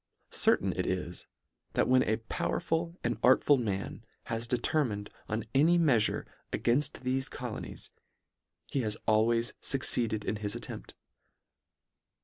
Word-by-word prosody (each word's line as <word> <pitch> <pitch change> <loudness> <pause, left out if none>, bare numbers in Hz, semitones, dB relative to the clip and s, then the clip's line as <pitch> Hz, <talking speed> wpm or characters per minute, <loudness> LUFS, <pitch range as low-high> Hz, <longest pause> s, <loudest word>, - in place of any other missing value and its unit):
Certain - - +3
it - - -2
is, - - -3 0.5
that - - +2
when 130 0 +5
a 110 +1 +1
powerful 165 +8 -2
and 120 -2 -1
art 130 +1 +5
ful 145 - +5
man 100 -4 -3 0.2
has 115 +1 -3
determined 120 -4 0 0.2
on 110 0 -2
any 160 +6 +5
meafure 135 -11 +3 0.3
a - - 0
gainfl: 135 +5 +2
thefe 130 +1 -1
colonies, - - -6 0.7
he 140 - -2
has 110 -2 -1
always 115 +2 +3
fucceed 130 -4 +1
ed 105 -1 -3
in 110 - -1
his 105 -1 -3
attempt. - - -7
120 Hz, 135 wpm, -30 LUFS, 110-135 Hz, 0.7 s, when